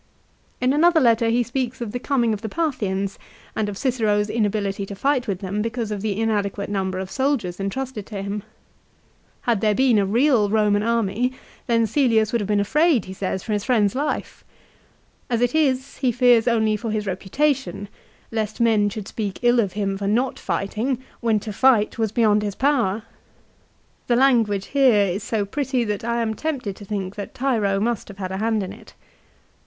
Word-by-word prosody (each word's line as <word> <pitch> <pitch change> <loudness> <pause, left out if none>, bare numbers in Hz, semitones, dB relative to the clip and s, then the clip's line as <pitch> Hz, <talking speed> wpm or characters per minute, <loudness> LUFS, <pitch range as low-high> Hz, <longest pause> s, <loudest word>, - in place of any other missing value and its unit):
In 255 +1 +2
another 335 +3 +5
letter 230 -3 +3
he 240 +2 +2
speaks 255 +1 -3
of 235 -3 -4
the 245 - -3
coming 245 -4 +1
of 205 - -4
the 220 - -4
Parthians, 200 - -2 0.4
and 215 -1 -1
of 200 - -6
Cicero's 215 -5 +1
inability 205 -3 -1
to 200 - -7
fight 260 +3 0
with 195 -2 -2
them 200 +2 -2
because 230 0 -3
of 205 -2 -3
the 210 -1 -2
inadequate 205 -2 -1
number 190 -2 -1
of 190 0 -5
soldiers 260 -11 -1
intrusted 210 +2 -4
to 205 -3 -6
him. 200 +1 -3 1.0
Had 235 -5 0
there 215 -1 +2
been 255 -3 +4
a 200 - +2
real 235 -1 +3
Eomau 210 -1 +2
army 230 +2 0 0.3
then 230 -2 +3
Caelius 225 -4 +2
wo - - +4
aid - - -3
have 200 - -3
been 210 -1 +2
afraid, 295 - +2
he 190 - -7
says, 190 -1 -3
for 220 - -2
his 205 -1 -1
friend's 215 -6 +2
life. 290 +3 -3 0.9
As 235 -2 +1
it 245 0 +1
is 275 -4 +1
he 255 -3 +1
fears 245 -2 +4
only 220 -2 +2
for 230 +2 -4
his 215 -1 -2
reputation, 205 +4 -1 0.4
lest 220 -1 -3
men 220 -3 +3
should 205 -1 -7
speak 205 -4 -4
ill 240 0 +4
of 200 -5 0
him 195 -1 -2
for 200 - -2
not 245 +5 0
fighting, 225 +6 -2 0.2
when 225 -3 +1
to 215 0 -6
fight 230 -2 +3
was 220 -2 0
beyond 215 -2 +3
his 205 -2 -3
power. 240 -7 +1
2 - - -27 1.0
The 240 - +3
language 230 -6 +3
here 250 -8 +5
is 190 +2 -2
so 220 -2 -1
pretty 265 +2 -1
that 210 -2 -3
I 235 0 0
am 220 -1 -1
tempted 250 -6 -3
to 205 - -10
think 195 -2 -4
that 200 - -7
Tiro 220 -7 +1
must 235 +2 -1
have 200 - -11
had 185 -2 -4
a 190 - -3
hand 220 0 0
in 185 - -6
it. - - -15
220 Hz, 195 wpm, -22 LUFS, 205-245 Hz, 1.0 s, another